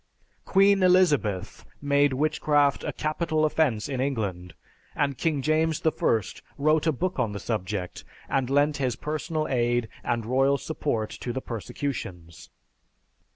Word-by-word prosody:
Queen 195 Hz, 0 st, +4 dB
Elizabeth 150 Hz, -, +2 dB, 0.2 s
made 145 Hz, 0 st, +2 dB
witchcraft 145 Hz, 0 st, +2 dB
a -, -, -2 dB
capital 155 Hz, 0 st, 0 dB
offense 145 Hz, -8 st, +1 dB
in 135 Hz, -3 st, -2 dB
England; 100 Hz, -, -3 dB, 0.4 s
and 140 Hz, -1 st, 0 dB
King 150 Hz, -5 st, 0 dB
James 155 Hz, +1 st, +1 dB
I 160 Hz, -, +5 dB, 0.7 s
wrote 155 Hz, +2 st, +2 dB
a -, -, +5 dB
book 180 Hz, +4 st, -2 dB
on 115 Hz, -5 st, 0 dB
the 100 Hz, -, -5 dB
subject, 95 Hz, -3 st, -4 dB, 0.2 s
and 135 Hz, -2 st, 0 dB
lent 145 Hz, +2 st, +2 dB
his 130 Hz, -4 st, -1 dB
personal 155 Hz, +3 st, -3 dB
aid 120 Hz, -2 st, 0 dB
and 120 Hz, -2 st, -1 dB
royal 135 Hz, +3 st, +2 dB
support 130 Hz, -8 st, -3 dB
to 120 Hz, -, -5 dB
the 130 Hz, -, -3 dB
persecutions. 95 Hz, -, -6 dB
140 Hz, 135 wpm, -26 LUFS, 115-155 Hz, 0.7 s, I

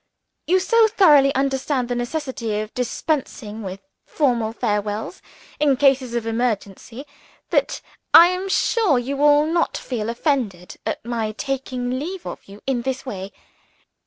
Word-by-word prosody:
You 370 Hz, +2 st, +4 dB
so 450 Hz, +4 st, +4 dB
thoroughly 295 Hz, -10 st, +5 dB
understand 270 Hz, -1 st, 0 dB
the 245 Hz, -, -2 dB
necessity 240 Hz, -4 st, -3 dB
of 215 Hz, +1 st, -6 dB
dispensing 250 Hz, -3 st, -3 dB
with 190 Hz, -1 st, -7 dB, 0.3 s
formal 240 Hz, -7 st, 0 dB
farewells, 210 Hz, -, -3 dB, 0.4 s
in 285 Hz, -3 st, +3 dB
cases 265 Hz, -3 st, +2 dB
of 235 Hz, -1 st, -2 dB
emergency, 225 Hz, +2 st, -3 dB, 0.5 s
that -, -, +1 dB, 0.3 s
I 340 Hz, +2 st, +9 dB
am 365 Hz, +2 st, -3 dB
sure 400 Hz, -, +2 dB
you 250 Hz, +3 st, -2 dB
will 295 Hz, +1 st, +4 dB
not 335 Hz, +2 st, 0 dB
feel 230 Hz, -4 st, -4 dB
offended 235 Hz, -, -2 dB
at -, -, -3 dB
my 225 Hz, -3 st, -2 dB
taking 255 Hz, 0 st, -3 dB
leave 360 Hz, +5 st, -6 dB
of -, -, -7 dB
you 200 Hz, +1 st, -14 dB
in 265 Hz, -3 st, 0 dB
this 265 Hz, +2 st, -4 dB
way. 195 Hz, -5 st, -6 dB
255 Hz, 140 wpm, -22 LUFS, 225-290 Hz, 0.5 s, I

